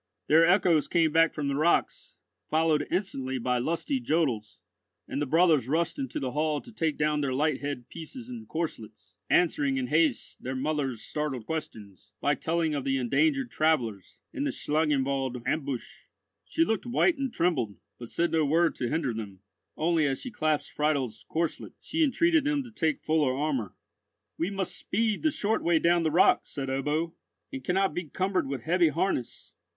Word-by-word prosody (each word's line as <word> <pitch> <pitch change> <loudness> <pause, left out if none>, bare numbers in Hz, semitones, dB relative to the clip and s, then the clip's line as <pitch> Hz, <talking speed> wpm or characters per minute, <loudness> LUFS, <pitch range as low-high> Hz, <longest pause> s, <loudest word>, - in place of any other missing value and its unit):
Their 165 +2 +5
echoes 175 -5 +4
came 165 -3 +2
back 165 0 +4
from 150 -2 -3
the 140 - 0
rocks, 155 +5 0 0.3
followed 155 -1 +2
instantly 135 -9 -2
by 125 0 0
lusty 170 - -1
jodels, 140 - -1 0.5
and 140 - -3
the 145 - -1
brothers 160 -4 +4
rushed 165 +4 0
into 135 -2 -3
the 130 -2 -3
hall 150 +2 0
to 240 - -13
take 160 -7 -1
down 150 0 +1
their 135 -2 -1
light 150 +3 +1
head 140 -4 -4
pieces 230 - -9
and 240 -3 -8
corslets, 110 - -5 0.2
answering 145 -6 +2
in 130 - -1
haste 155 -4 +1
their 130 +1 -4
mother's 135 -4 -2
startled 150 -7 -3
questions, 105 - -7
by 145 - +2
telling 165 0 0
of 140 -2 -2
the 135 0 0
endangered 270 - +1
travellers, 120 - 0 0.2
and 280 - -2
the 290 - 0
Schlangenwald 140 - 0
ambush. 140 -5 -3 0.4
She 330 - +1
looked 225 - -1
white 280 +6 +2
and 270 -2 -1
trembled, 135 - 0 0.2
but 120 -1 -8
said 170 0 0
no 160 -1 +2
word 165 +4 +3
to 120 - -2
hinder 150 -5 -1
them; 100 -4 -7 0.4
only 160 -1 +2
as 135 -1 -1
she 255 - -6
clasped 155 -6 -1
Friedel's 140 -7 -1
corslet, 165 0 -2
she 320 +1 0
entreated 325 +3 +3
them 290 -1 +1
to 245 - -12
take 160 -8 -1
fuller 150 -5 +2
armour. 135 -10 -2 0.6
"We 170 - 0
must 190 -2 -3
speed 215 +2 -1
the 315 - +3
short 220 -6 0
way 170 -1 +3
down 170 +1 +3
the 160 - +1
rock," 170 +4 +4
said 135 -2 -4
Ebbo, 150 +5 -1 0.4
"and 135 - -5
cannot 190 +5 +1
be 175 - -3
cumbered 185 +2 -1
with 135 -3 -4
heavy 175 +1 +3
harness. 165 -5 -2
155 Hz, 175 wpm, -28 LUFS, 135-175 Hz, 0.6 s, Their